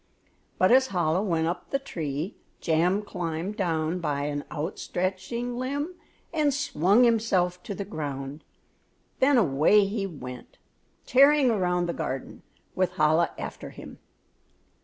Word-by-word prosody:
But 185 Hz, -, +4 dB
as 260 Hz, +1 st, +6 dB
Chola 175 Hz, -4 st, +1 dB
went 165 Hz, -6 st, 0 dB
up 170 Hz, +2 st, -3 dB
the 275 Hz, -, +1 dB
tree, 165 Hz, -, -4 dB, 0.2 s
Jam 175 Hz, +5 st, +1 dB
climbed 175 Hz, 0 st, -4 dB
down 165 Hz, -2 st, -1 dB
by 145 Hz, -4 st, -1 dB
an 145 Hz, 0 st, -2 dB
out 155 Hz, +5 st, -4 dB
stretching 215 Hz, +7 st, -3 dB
limb 285 Hz, +6 st, -2 dB, 0.4 s
and 305 Hz, -3 st, +2 dB
swung 250 Hz, -, +3 dB
himself 195 Hz, -7 st, +2 dB
to 200 Hz, -, -6 dB
the 200 Hz, -, -4 dB
ground, 145 Hz, -5 st, -5 dB, 0.8 s
then 270 Hz, 0 st, +5 dB
away 190 Hz, -, +4 dB
he 200 Hz, 0 st, -2 dB
went 125 Hz, -7 st, -9 dB, 0.5 s
tearing 275 Hz, 0 st, +5 dB
around 180 Hz, -4 st, +1 dB
the 170 Hz, -, -2 dB
garden 130 Hz, 0 st, -5 dB, 0.3 s
with 185 Hz, -2 st, 0 dB
Chola 155 Hz, +2 st, +3 dB
after -, -, -6 dB
him. -, -, -11 dB
180 Hz, 135 wpm, -27 LUFS, 160-230 Hz, 0.8 s, as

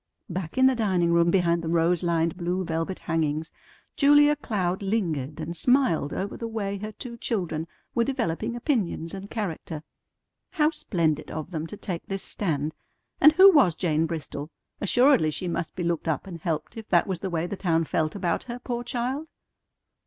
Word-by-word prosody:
Back 175 Hz, +1 st, -5 dB
in 260 Hz, -, +5 dB
the 265 Hz, -, +6 dB
dining 185 Hz, -7 st, +1 dB
room 170 Hz, 0 st, +4 dB
behind 170 Hz, -2 st, +2 dB
the 165 Hz, -, -5 dB
rose 170 Hz, +1 st, +2 dB
lined 170 Hz, 0 st, +1 dB
blue 180 Hz, +1 st, -1 dB
velvet 165 Hz, +3 st, -2 dB
hangings 160 Hz, -1 st, -1 dB, 0.4 s
Julia 290 Hz, +1 st, +6 dB
Cloud 190 Hz, -10 st, -2 dB
lingered 165 Hz, -, -1 dB
and 165 Hz, +2 st, -4 dB
smiled 245 Hz, -, +2 dB
over 200 Hz, +1 st, -3 dB
the 230 Hz, -, -5 dB
way 200 Hz, -3 st, -3 dB
her 215 Hz, +2 st, -5 dB
two 235 Hz, +2 st, -8 dB
children 175 Hz, -9 st, -2 dB, 0.3 s
were 235 Hz, -, +2 dB
developing 230 Hz, -3 st, -2 dB
opinions 215 Hz, -, -1 dB
and 195 Hz, +1 st, -7 dB
character. 165 Hz, -7 st, -4 dB, 0.7 s
How 310 Hz, -3 st, +3 dB
splendid 160 Hz, -, -1 dB
of 160 Hz, +3 st, -5 dB
them 160 Hz, -2 st, -3 dB
to 210 Hz, -, -9 dB
take 175 Hz, -4 st, -5 dB
this 195 Hz, 0 st, -3 dB
stand! 155 Hz, -6 st, -2 dB, 0.5 s
And 305 Hz, -, +8 dB
who 380 Hz, +4 st, +9 dB
was 265 Hz, -, +5 dB
Jane 160 Hz, -2 st, +1 dB
Bristol? 155 Hz, -2 st, -5 dB, 0.3 s
Assuredly 245 Hz, -, +4 dB
she 180 Hz, +4 st, -3 dB
must 170 Hz, -1 st, -3 dB
be 180 Hz, -, -3 dB
looked 170 Hz, -1 st, -1 dB
up 155 Hz, -4 st, -1 dB
and 175 Hz, -3 st, -8 dB
helped 165 Hz, +5 st, -3 dB
if 220 Hz, -1 st, -8 dB
that 175 Hz, -2 st, +4 dB
was 185 Hz, -3 st, -3 dB
the 190 Hz, -, -3 dB
way 165 Hz, -1 st, -1 dB
the 190 Hz, -, -4 dB
town 165 Hz, -4 st, +1 dB
felt 155 Hz, +1 st, -1 dB
about 185 Hz, -4 st, 0 dB
her, 240 Hz, -1 st, -5 dB
poor 240 Hz, -1 st, -4 dB
child! 255 Hz, +5 st, -2 dB
180 Hz, 180 wpm, -26 LUFS, 165-230 Hz, 0.7 s, who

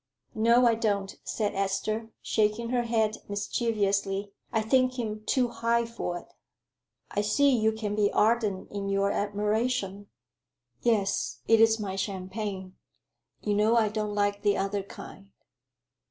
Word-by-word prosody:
"No, 235 Hz, +3 st, +4 dB
I 235 Hz, -, +5 dB
don't," 205 Hz, -3 st, -1 dB
said 210 Hz, -2 st, -2 dB
Esther, 195 Hz, +3 st, -1 dB
shaking 215 Hz, +2 st, +1 dB
her 245 Hz, -1 st, +1 dB
head 220 Hz, -2 st, +1 dB
mischievously. 200 Hz, -1 st, -1 dB, 0.2 s
"I 220 Hz, -2 st, +1 dB
think 255 Hz, +2 st, +2 dB
him 215 Hz, -3 st, -3 dB
too 250 Hz, -2 st, +2 dB
high 235 Hz, 0 st, +1 dB
for 230 Hz, -6 st, -4 dB
it." -, -, -10 dB, 0.9 s
"I 205 Hz, -, 0 dB
see 275 Hz, +6 st, +3 dB
you 220 Hz, -1 st, +2 dB
can 220 Hz, -2 st, -3 dB
be 210 Hz, -1 st, +2 dB
ardent 215 Hz, -4 st, +1 dB
in 200 Hz, -1 st, -3 dB
your 195 Hz, 0 st, +1 dB
admiration." 205 Hz, 0 st, -1 dB, 0.7 s
"Yes, 210 Hz, -5 st, 0 dB
it 225 Hz, 0 st, +5 dB
is 225 Hz, 0 st, +5 dB
my 195 Hz, -2 st, -3 dB
champagne; 190 Hz, 0 st, -4 dB, 0.6 s
you 210 Hz, -, 0 dB
know 210 Hz, +3 st, +3 dB
I 220 Hz, -2 st, +3 dB
don't 210 Hz, -1 st, -3 dB
like 205 Hz, 0 st, 0 dB
the 205 Hz, -1 st, +2 dB
other 195 Hz, +1 st, -1 dB
kind." 195 Hz, 0 st, -11 dB
210 Hz, 140 wpm, -28 LUFS, 200-230 Hz, 0.9 s, I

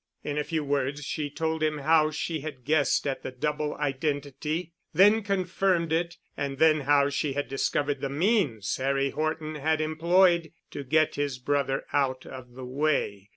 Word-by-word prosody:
In 145 Hz, 0 st, -2 dB
a -, -, 0 dB
few 160 Hz, 0 st, -2 dB
words 140 Hz, 0 st, -1 dB
she 145 Hz, +1 st, -3 dB
told 160 Hz, +2 st, -2 dB
him 155 Hz, -1 st, +1 dB
how 155 Hz, +2 st, +3 dB
she 160 Hz, +1 st, -3 dB
had 140 Hz, -4 st, -8 dB
guessed 150 Hz, -1 st, +2 dB
at 135 Hz, -2 st, -2 dB
the -, -, -5 dB
double 150 Hz, +3 st, -2 dB
identity—then 155 Hz, +8 st, 0 dB
confirmed 185 Hz, -3 st, 0 dB
it, 170 Hz, +1 st, -1 dB, 0.2 s
and 140 Hz, -1 st, -3 dB
then 155 Hz, +1 st, +5 dB
how 140 Hz, 0 st, +3 dB
she 140 Hz, 0 st, -1 dB
had 145 Hz, +1 st, -2 dB
discovered 140 Hz, +1 st, -1 dB
the 140 Hz, -, -2 dB
means 145 Hz, -, +1 dB
Harry 135 Hz, +1 st, 0 dB
Horton 155 Hz, 0 st, -2 dB
had 155 Hz, +1 st, 0 dB
employed 170 Hz, +2 st, +3 dB, 0.2 s
to 145 Hz, -, -5 dB
get 155 Hz, +3 st, +2 dB
his 145 Hz, -2 st, -1 dB
brother 140 Hz, +1 st, -1 dB
out 130 Hz, -2 st, 0 dB
of 125 Hz, -2 st, -10 dB
the 130 Hz, 0 st, -8 dB
way. 125 Hz, -7 st, -1 dB
150 Hz, 165 wpm, -27 LUFS, 140-160 Hz, 0.2 s, then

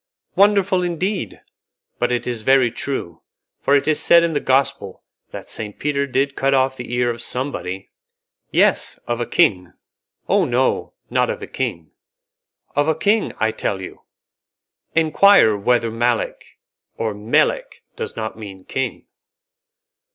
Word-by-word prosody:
"Wonderful, 200 Hz, -2 st, +3 dB
indeed! 180 Hz, +3 st, -3 dB, 0.6 s
But 120 Hz, 0 st, +1 dB
it 120 Hz, -, -1 dB
is 120 Hz, -3 st, -3 dB
very 130 Hz, 0 st, +4 dB
true, 130 Hz, -12 st, -5 dB, 0.4 s
for 140 Hz, -, +2 dB
it 140 Hz, -, +1 dB
is 155 Hz, -, +2 dB
said 170 Hz, 0 st, +5 dB
in 170 Hz, -1 st, 0 dB
the 145 Hz, -, +1 dB
Gospel 135 Hz, -8 st, 0 dB, 0.3 s
that -, -, -9 dB
Saint 105 Hz, -2 st, -6 dB
Peter 140 Hz, -1 st, -1 dB
did 140 Hz, +1 st, 0 dB
cut 135 Hz, 0 st, +2 dB
off 130 Hz, 0 st, +2 dB
the 125 Hz, -1 st, -8 dB
ear 120 Hz, 0 st, +1 dB
of 120 Hz, -, -6 dB
somebody." 95 Hz, -8 st, -3 dB, 0.6 s
"Yes, -, -, +2 dB
of 120 Hz, 0 st, -2 dB
a 120 Hz, -, -2 dB
king." 90 Hz, -3 st, +2 dB, 0.5 s
"Oh, 195 Hz, -2 st, +3 dB
no! 130 Hz, -1 st, 0 dB, 0.2 s
not -, -, +2 dB
of -, -, -4 dB
a -, -, -3 dB
king." -, -, -4 dB, 0.8 s
"Of 145 Hz, +1 st, +2 dB
a 160 Hz, -, +2 dB
king, 205 Hz, +6 st, +1 dB
I 110 Hz, 0 st, +1 dB
tell 100 Hz, -2 st, -3 dB
you. 95 Hz, -, -9 dB, 0.9 s
Enquire 160 Hz, -, +5 dB
whether 115 Hz, +2 st, +1 dB
Malek 120 Hz, +1 st, -2 dB, 0.4 s
or 110 Hz, -2 st, -2 dB
Melek 105 Hz, +2 st, 0 dB
does -, -, -5 dB
not 110 Hz, -1 st, -4 dB
mean 100 Hz, -4 st, -10 dB
king." 130 Hz, -, -3 dB
130 Hz, 145 wpm, -20 LUFS, 110-155 Hz, 0.9 s, said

